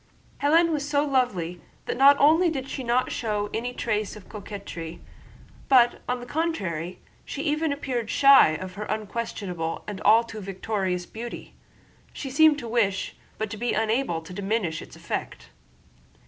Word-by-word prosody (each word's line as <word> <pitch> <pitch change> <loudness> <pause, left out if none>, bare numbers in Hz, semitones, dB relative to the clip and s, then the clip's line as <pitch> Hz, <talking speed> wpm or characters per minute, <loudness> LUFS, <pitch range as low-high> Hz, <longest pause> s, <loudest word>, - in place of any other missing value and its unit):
Hélène 330 +4 +4
was 290 -2 -2
so 290 0 +2
lovely 195 - 0 0.2
that - - -2
not 275 +2 +7
only 320 +5 +5
did 270 -4 -4
she 270 - -5
not 245 +1 +1
show 210 -3 -2
any 240 +2 -2
trace 215 -4 -2
of 210 -3 -13
coquetry, 195 -6 -7 0.7
but 245 -3 +5
on 250 0 0
the 245 - -8
contrary 190 - -2 0.2
she 285 - -5
even 305 +1 0
appeared 255 -6 -3
shy 275 - +7
of 185 +3 -6
her 210 +2 -5
unquestionable 205 -6 -4
and 205 -2 -6
all 225 +3 +6
too 220 -2 -8
victorious 190 -2 -2
beauty. 235 +5 -8 0.6
She 270 - -6
seemed 310 +1 +5
to 240 - -6
wish, 215 -5 0 0.2
but 215 -1 -3
to 220 - -5
be 240 +3 -1
unable, 220 -6 0
to 180 - -10
diminish 195 -4 -1
its - - -12
effect. - - -5
225 Hz, 160 wpm, -26 LUFS, 195-275 Hz, 0.7 s, not